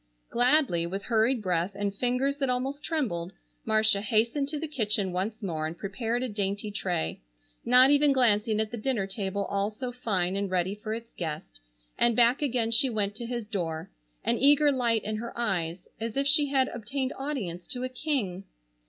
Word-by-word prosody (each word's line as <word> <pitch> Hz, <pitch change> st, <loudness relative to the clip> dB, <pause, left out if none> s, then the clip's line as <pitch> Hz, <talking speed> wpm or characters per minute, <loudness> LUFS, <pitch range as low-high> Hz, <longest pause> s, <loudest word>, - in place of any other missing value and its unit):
Gladly, 245 Hz, -, +3 dB
with 195 Hz, +3 st, -4 dB
hurried 230 Hz, +1 st, +2 dB
breath 180 Hz, +1 st, 0 dB
and 200 Hz, 0 st, -2 dB
fingers 250 Hz, +5 st, 0 dB
that 270 Hz, -2 st, -1 dB
almost 265 Hz, +4 st, -2 dB
trembled, 215 Hz, -, -2 dB, 0.3 s
Marcia 215 Hz, -2 st, +3 dB
hastened 235 Hz, +6 st, +1 dB
to 305 Hz, -, -2 dB
the 315 Hz, +2 st, -4 dB
kitchen 210 Hz, -8 st, -1 dB
once 210 Hz, +5 st, -3 dB
more 160 Hz, -5 st, -2 dB
and 165 Hz, +2 st, -7 dB
prepared 225 Hz, +6 st, -2 dB
a -, -, -1 dB
dainty 205 Hz, -1 st, -2 dB
tray, 180 Hz, -, -2 dB, 0.4 s
not 250 Hz, +3 st, +7 dB
even 290 Hz, 0 st, +5 dB
glancing 220 Hz, -4 st, +3 dB
at 220 Hz, -1 st, -1 dB
the 240 Hz, -, -4 dB
dinner 225 Hz, -3 st, -1 dB
table 195 Hz, 0 st, -3 dB
all 200 Hz, +1 st, -1 dB
so 245 Hz, +4 st, -5 dB
fine 195 Hz, -7 st, 0 dB
and 200 Hz, 0 st, -1 dB
ready 185 Hz, +1 st, 0 dB
for 215 Hz, +1 st, -4 dB
its 230 Hz, 0 st, -9 dB
guest, 150 Hz, -, -6 dB, 0.4 s
and 235 Hz, -1 st, +4 dB
back 240 Hz, +4 st, +4 dB
again 245 Hz, -5 st, 0 dB
she 265 Hz, +3 st, +4 dB
went 210 Hz, -3 st, -1 dB
to 230 Hz, +3 st, -6 dB
his 235 Hz, -3 st, -4 dB
door, 170 Hz, -7 st, -3 dB, 0.3 s
an 235 Hz, -, +1 dB
eager 290 Hz, +1 st, +5 dB
light 235 Hz, -4 st, +1 dB
in 215 Hz, +1 st, -2 dB
her 235 Hz, +2 st, -6 dB
eyes, 180 Hz, -6 st, -1 dB
as 225 Hz, +2 st, -4 dB
if 275 Hz, -, +2 dB
she 290 Hz, +1 st, +4 dB
had 270 Hz, -2 st, +2 dB
obtained 255 Hz, +4 st, -3 dB
audience 205 Hz, -, -4 dB
to 250 Hz, 0 st, -3 dB
a -, -, 0 dB
king. 250 Hz, -, -2 dB
220 Hz, 190 wpm, -28 LUFS, 195-255 Hz, 0.4 s, not